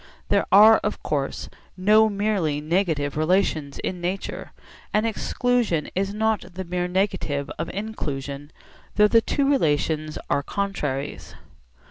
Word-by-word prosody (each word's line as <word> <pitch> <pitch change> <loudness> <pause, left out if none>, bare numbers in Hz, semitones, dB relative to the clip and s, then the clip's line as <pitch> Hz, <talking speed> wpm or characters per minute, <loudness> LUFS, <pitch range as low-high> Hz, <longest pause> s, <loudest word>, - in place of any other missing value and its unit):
There - - +2
are 215 +3 +8
of 210 - -4
course 140 -2 -2 0.3
no 215 +4 +5
merely 200 -8 0
negative 155 -3 0
relations 155 -3 0
in 180 -1 -4
nature, 185 +3 -4 0.4
and 215 +1 +1
exclusion 230 -5 0
is 195 +1 -1
not 210 -4 -1
the 190 - -4
mere 180 0 -2
negative 180 -7 -1
of 165 - -3
inclusion, 145 -9 -5 0.4
though 210 0 +6
the 230 +1 +4
two 275 +4 0
relations 155 - +1
are 140 - +1
contraries. 145 -6 -4
185 Hz, 125 wpm, -24 LUFS, 150-210 Hz, 0.4 s, are